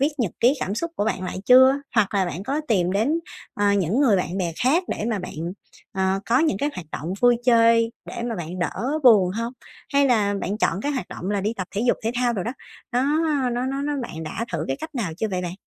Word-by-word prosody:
viết 280 - +4
nhật 225 -8 0
ký 245 +4 +5
cảm 195 - -2
xúc 335 +8 -3
của 205 - 0
bạn 210 -4 -1
lại 185 0 -4
chưa, 260 +1 +8 0.2
hoặc 215 -3 +2
là 195 -2 +3
bạn 175 +1 -5
có 280 +7 -1
tìm 185 -4 +2
đến, 275 +12 +1 0.3
ờ, 205 0 +2
những 200 - +1
người 240 -8 +4
bạn 180 +1 -2
bè 170 -3 -1
khác 290 +9 +3
để - - -3
mà 215 - -1
bạn, 180 - -7 0.6
ờ, 190 0 0
có 240 +3 +3
những 305 -11 +1
cái 290 +5 0
hoạt 180 - -7
động 165 +5 -4
vui 245 -1 +5
chơi 230 -1 +4
để 235 - -6
mà 235 -1 -2
bạn 175 +1 -6
đỡ 255 - -1
buồn 205 -7 +6
hông? 230 +5 -3 0.4
Hay 280 0 +4
là 210 -5 +2
bạn 205 +2 -3
chọn 200 - +1
cái 290 +6 -1
hoạt 260 - -4
động 185 - -5
là 205 -1 0
đi 210 +3 -1
tập 185 - -4
thể 200 - 0
dục - - +4
thể 225 - 0
thao 245 -1 +1
đồ 195 -5 -2
đó, 235 - -3 0.4
nó 245 - +2 0.5
nó 245 +1 -1
nó 275 +1 -2
nó 295 +1 -1
bạn 160 -9 -6
đã 195 +8 -4
thử 160 -2 -2
cái 135 - -1
cách 315 - -7
nào 210 -11 -2
chưa 220 +4 -1
vậy 180 -1 -2
bạn? 175 0 -4
220 Hz, 255 wpm, -23 LUFS, 190-250 Hz, 0.6 s, chưa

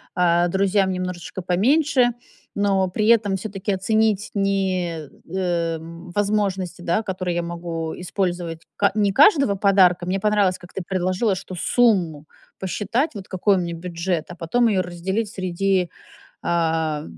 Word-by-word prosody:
а 175 -1 +3
друзьям 190 +1 +2
немножечко 180 -1 -4
поменьше. 250 - +3 0.4
Но 195 -2 +2
при 210 +4 -1
этом 215 -4 +4
всё-таки 200 +1 -4
оценить 215 +2 +1
ни, 185 -5 -1 0.3
эм, 170 -2 -2
возможности, 195 -3 -1
да 175 +4 +1
которые 185 -3 -3
я 175 - -1
могу 170 -1 -4
использовать, 175 -3 -3
ка 200 - +2
не 205 -2 +2
каждого 280 - +5
подарка. 190 -3 +4
Мне 185 +2 -1
понравилось, 205 -2 +2
как 175 - -15
ты 190 - -4
предложила, 185 +2 0
что 185 - -7
сумму 175 -8 +2 0.3
посчитать 220 - -1
вот 200 -4 -8
какой 195 +2 +2
у - - +1
меня 170 -1 -3
бюджет, 170 -1 -3
а 175 - -8
потом 235 +9 +1
её 200 -4 +2
разделить 185 +5 -3
среди, 185 -1 0 0.5
а, 160 -3 0
185 Hz, 140 wpm, -22 LUFS, 175-205 Hz, 0.5 s, каждого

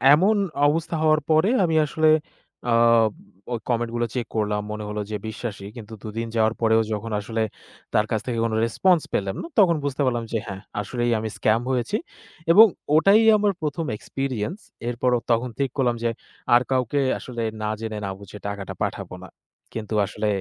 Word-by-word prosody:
এমন 195 +8 +3 0.3
অবস্থা 165 +3 0
হওয়ার 155 -1 +4
পরে 160 +5 +4
আমি 165 -2 +1
আসলে, 155 +2 +1 0.6
আ - - +4 0.8
ওই 120 - -1
comment 120 -1 0
গুলো 120 0 +1
check 125 -2 -2
করলাম, 105 -1 0
মনে 105 0 -4
হলো 105 0 -3
যে - - -1
বিশ্বাসী। 105 -2 -6
কিন্তু 115 -2 -9
দু - - -6
দিন 115 0 -2
যাওয়ার 110 0 +3
পরেও 110 0 +4
যখন 110 +2 -4
আসলে 110 +2 -3 0.5
তার 105 - +3
কাছ 110 - +1
থেকে 115 -2 -1
কোনো 110 -1 -1
response 170 +8 +3
পেলাম 95 -1 -1
না, - - -6
তখন 180 -5 +6
বুঝতে 145 0 -2
পারলাম 120 -2 0
যে - - +2
"হ্যাঁ, 95 -2 -6 0.2
আসলেই 120 +3 -1
আমি 110 0 -3
scam 110 +2 +2
হয়েছি" 130 - 0 0.5
এবং 210 +6 +10 0.3
ওটাই 195 +8 +6 0.2
আমার 205 -1 +2
১ম 155 +1 -2
experience। 135 - -4 0.3
এরপরও 125 0 +1
তখন 120 +2 +1
ঠিক 135 -1 +1
করলাম 125 -3 +2
যে, 120 - +2 0.4
আর 120 - +7
কাউকে 130 +1 +1 0.2
আসলে 120 -2 -6 0.2
না 105 - -1
জেনে 110 -1 -4
না - - -3
বুঝে 100 0 -10
টাকাটা 100 -1 -5
পাঠাবো - - -4
না। - - -9 0.5
কিন্তু 110 -1 -5
আসলে 105 +2 -3
120 Hz, 180 wpm, -24 LUFS, 110-150 Hz, 0.8 s, এবং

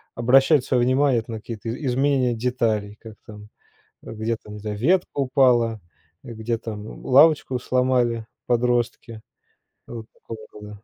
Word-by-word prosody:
обращать 135 +4 +4
своё 125 -2 +1
внимание, 130 0 +2
это 115 - -9
на 110 - -5
какие-то 115 0 -7
и 135 +5 -5
изменения 130 -1 +1
деталей, 110 -4 -1
как 110 -2 -11
там, 105 -1 -12 0.5
где 110 +1 -4
там, 105 -1 -13
не - - -8
знаю, 105 0 -5
ветка 175 - +1
упала, 125 -5 +2 0.4
где 115 0 -4
там 110 -2 -8
лавочку 140 -1 +4
сломали 125 -3 0 0.2
подростки, 120 -2 -1 0.6
вот 115 -2 -9
такого 110 -1 -11
рода. 105 0 -11
120 Hz, 140 wpm, -22 LUFS, 110-130 Hz, 0.6 s, обращать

